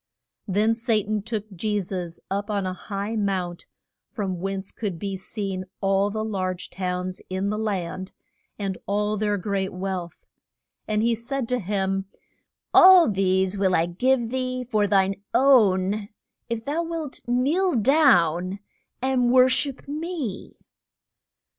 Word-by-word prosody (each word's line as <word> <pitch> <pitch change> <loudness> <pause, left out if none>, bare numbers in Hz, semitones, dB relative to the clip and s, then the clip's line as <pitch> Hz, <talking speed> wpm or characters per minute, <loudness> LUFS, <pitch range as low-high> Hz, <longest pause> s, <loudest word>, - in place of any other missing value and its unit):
Then 210 +3 +2
Sa 230 +1 -1
tan 215 0 0
took 215 0 -4
Je 210 +4 0
sus 180 -3 -5
up 200 +2 -2
on 200 -2 -1
a 185 - -2
high 200 +3 -4
mount, 190 -4 -2 0.4
from 195 -7 -3
whence 195 +1 -4
could 200 -6 -4
be 195 +3 -4
seen 190 -1 -4
all 195 0 +2
the 215 +1 -3
large 185 -4 -3
towns 180 0 -3
in 190 +2 -1
the 210 - -2
land, 190 -3 -3 0.5
and 195 -3 -3
all 210 +1 0
their 210 0 0
great 195 0 -2
wealth. 185 -2 -4 0.7
And 215 0 +1
he 235 0 +3
said 235 +2 -3
to 250 0 +1
him, 195 -1 -1 0.7
All 365 - +8
these 190 0 +1
will 190 -2 +3
I 165 - +3
give 235 +7 +1
thee 255 -1 -2
for 215 -4 +1
thine 195 0 +2
own 210 -6 +4 0.4
if 230 -1 -3
thou 300 +4 -1
wilt 330 -4 -5
kneel 285 +9 +2
down 200 - +3 0.5
and 260 -2 +2
wor 255 +1 +6
ship 275 +1 -1
me. 300 - -5
205 Hz, 140 wpm, -24 LUFS, 190-240 Hz, 0.7 s, All